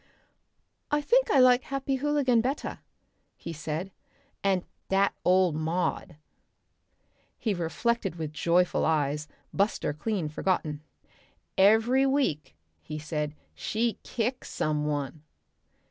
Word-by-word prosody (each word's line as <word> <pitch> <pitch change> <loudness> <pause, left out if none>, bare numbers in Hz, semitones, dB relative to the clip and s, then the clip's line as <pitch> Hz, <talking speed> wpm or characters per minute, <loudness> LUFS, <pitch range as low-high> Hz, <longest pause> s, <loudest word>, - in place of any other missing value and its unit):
"I 295 - +2
think 480 +12 +3
I 285 - +4
like 255 -1 +6
Happy 275 0 -2
Hooligan 275 -4 +2
better," 265 +5 -3 0.6
he 170 - -6
said. 160 +4 -4 0.5
"And 190 -2 +1 0.2
dat 195 +1 +3
ole 185 -1 +4
Maud." 160 +2 -2 1.2
He 220 - 0
reflected 195 +3 -1
with 155 -3 -5
joyful 170 +4 +2
eyes, 150 -1 +1 0.3
Buster 200 -6 0
clean 185 +1 -2
forgotten. 155 -2 -1 0.7
"Every 225 +7 +5
week," 155 - 0 0.3
he 155 - -6
said, 150 -1 -3 0.2
"she 225 -1 -1
kicks 245 +2 -3
some 150 -1 -1
one." 145 0 -3
185 Hz, 110 wpm, -28 LUFS, 155-245 Hz, 1.2 s, like